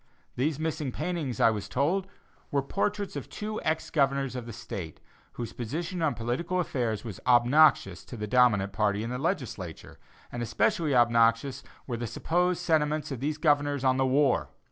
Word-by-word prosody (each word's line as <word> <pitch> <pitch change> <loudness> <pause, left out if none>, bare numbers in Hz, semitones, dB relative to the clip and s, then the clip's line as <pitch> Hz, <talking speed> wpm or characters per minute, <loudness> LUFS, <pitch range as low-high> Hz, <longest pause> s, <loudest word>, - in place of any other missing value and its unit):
These 140 +3 0
missing 155 -3 -2
paintings, 155 -7 -3
I 115 - +5
was 105 -2 -5
told, 175 +9 0 0.4
were 140 -1 0
portraits 200 +6 -2
of - - -6
two 215 0 -5
ex 160 0 -1
Governors 135 -3 +1
of 125 -2 -5
the - - -6
State, 100 -7 -7 0.3
whose 120 - -6
position 165 - -4
on 160 -3 +1
political 130 +11 -2
affairs 120 - -1
was 105 -5 -7
obnoxious 120 - +4
to 120 - -9
the 105 - -3
dominant 105 -4 +3
party 105 0 +1
in 115 - -4
the 125 - -3
Legislature; 130 - -4 0.3
and 120 - -4
especially 125 +6 +1
obnoxious 120 +3 +3 0.2
were 120 -3 -3
the 120 0 -3
supposed 180 +7 0
sentiments 155 -3 +1
of 135 - -4
these 150 +3 -2
governors 145 -3 +2
on 130 -1 +3
the 135 0 +2
war. 135 0 +2
135 Hz, 170 wpm, -28 LUFS, 115-155 Hz, 0.4 s, I